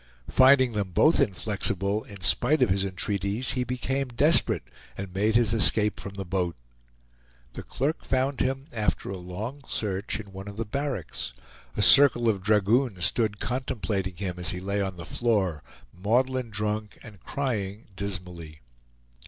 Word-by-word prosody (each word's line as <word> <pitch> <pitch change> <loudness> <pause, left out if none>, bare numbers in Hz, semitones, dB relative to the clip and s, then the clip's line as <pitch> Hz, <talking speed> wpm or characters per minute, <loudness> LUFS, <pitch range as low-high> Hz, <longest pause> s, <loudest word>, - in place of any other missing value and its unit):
Finding 130 -1 +6
them 100 -3 -2
both 160 - +4
inflexible 100 -2 0
in 100 -2 -11
spite 130 +9 +3
of - - +2
his 95 0 +2
entreaties, 100 +4 -1
he 125 - -1
became 130 +2 -2
desperate 145 +7 +4 0.3
and 95 -2 -6
made 105 +3 +1
his 115 -2 +3
escape 105 -2 +3
from 100 - -8
the 100 -1 -5
boat. 90 -1 -1 1.0
The - - -6
clerk 145 +5 -2
found 135 +1 0
him 135 +1 -1
after 105 -3 -1
a 95 - -4
long 105 +11 -6
search 100 0 -2
in 105 -2 -9
one 95 +1 -9
of 100 0 -8
the 115 - -2
barracks; 125 - -3 0.4
a 105 - +2
circle 130 -3 +6
of 100 -4 +1
dragoons 105 0 +2
stood 105 -1 0
contemplating 105 -7 -2
him 90 -1 -4
as 85 -2 0
he 90 - -2
lay 100 +2 -2
on 95 -2 -3
the 85 - -8
floor, 100 -10 0 0.3
maudlin 125 +6 0
drunk 105 0 -3
and 105 -3 -12
crying 110 -7 -3
dismally. 90 -6 -6
105 Hz, 155 wpm, -26 LUFS, 95-125 Hz, 1.0 s, Finding